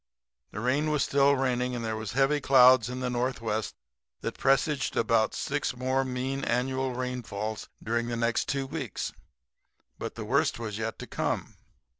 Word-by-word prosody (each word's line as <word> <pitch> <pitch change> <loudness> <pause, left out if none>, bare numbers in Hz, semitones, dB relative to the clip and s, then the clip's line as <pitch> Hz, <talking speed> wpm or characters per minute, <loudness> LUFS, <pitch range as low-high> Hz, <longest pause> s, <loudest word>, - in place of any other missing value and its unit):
The 100 - -6
rain 135 +7 +1
was 150 -2 +2
still 140 0 +4
raining, 125 -1 0
and 115 -1 -3
there 110 0 -1
was 110 -2 -5
heavy 135 +3 +2
clouds 130 -3 +6
in 125 +1 -4
the 125 - -1
northwest 115 -4 -2 0.5
that - - -3
presaged 135 +1 +1
about 115 -1 +2
six 145 -2 -1
more 130 +2 +1
mean 130 +1 -3
annual 130 +1 0
rainfalls 110 -4 -4
during 115 +1 0
the 120 -1 -2
next 115 0 +1
two 135 -1 0
weeks. 135 - -4 0.9
But - - -5
the - - -5
worst - - +2
was 110 -2 -5
yet 110 0 -3
to - - -7
come. - - -2
125 Hz, 165 wpm, -28 LUFS, 115-135 Hz, 0.9 s, clouds